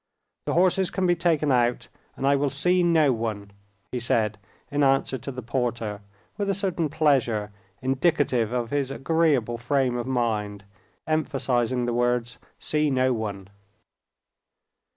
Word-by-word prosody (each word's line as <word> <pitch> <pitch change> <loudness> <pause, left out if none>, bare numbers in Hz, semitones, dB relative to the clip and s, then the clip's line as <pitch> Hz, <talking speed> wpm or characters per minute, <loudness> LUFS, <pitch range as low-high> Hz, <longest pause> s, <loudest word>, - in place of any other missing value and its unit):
"The - - 0
horses 185 +1 +3
can 190 - -1
be 175 -1 +3
taken 160 -4 +1
out 120 -1 +1 0.3
and 135 - -2
I 140 +1 +4
will 140 0 +1
see 180 +7 +2
no 160 -5 +4
one," 110 -3 -4 0.4
he 125 - -2
said 110 -3 0 0.3
in 145 +1 0
answer 135 -1 +2
to 140 - -6
the 125 -1 -7
porter, 115 -4 -2 0.4
with 200 -1 -1
a 195 - +1
certain 180 -5 -1
pleasure, 135 -9 +1 0.3
indicative 130 -4 +1
of 120 -2 -2
his 140 -2 0
agreeable 135 -5 +1
frame 130 0 +1
of 120 +1 -4
mind, 110 -5 -1 0.4
emphasizing 130 -6 0
the 120 - -1
words, 120 0 0 0.2
"see 150 -1 0
no 130 -1 +2
one." 100 -4 -5
130 Hz, 145 wpm, -25 LUFS, 120-150 Hz, 0.4 s, I